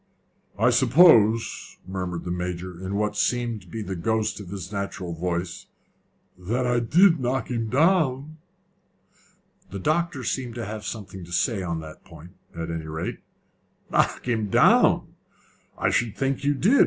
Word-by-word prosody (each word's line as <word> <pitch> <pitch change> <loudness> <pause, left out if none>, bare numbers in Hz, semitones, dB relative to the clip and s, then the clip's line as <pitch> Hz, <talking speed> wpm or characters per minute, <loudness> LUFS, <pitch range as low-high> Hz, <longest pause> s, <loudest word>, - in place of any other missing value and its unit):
"I 115 +4 +4
suppose," 120 - +4
murmured 90 -2 -4
the 90 - -4
Major, 90 0 -5
in 95 +2 -3
what 105 0 -1
seemed 120 0 0
to 90 - -19
be 110 +5 -5
the 95 -1 -4
ghost 110 +4 -1
of 100 -4 -9
his 95 -1 -7
natural 100 -3 -4
voice, 85 +1 -3 0.7
"that 115 +8 -1
I 120 -1 +2
did 165 +8 +4
knock 130 +1 -2
him 115 -2 -1
down?" 155 - +2 1.3
The 100 - -6
doctor 155 - -1
seemed 125 -3 -3
to 120 -2 -4
have 105 0 -6
something 95 -4 -7
to 85 - -14
say 95 +4 0
on 85 -3 -3
that 80 -1 -11
point, 85 +4 -14 0.2
at 85 0 -4
any 80 -1 -5
rate. 80 +1 -4 0.7
"Knock - - +1
him 110 -4 0
down! - - +4 0.6
I - - +1
should 115 -2 0
think 135 0 -1
you 145 +1 +2
did! 220 - +3
110 Hz, 155 wpm, -25 LUFS, 90-125 Hz, 1.3 s, I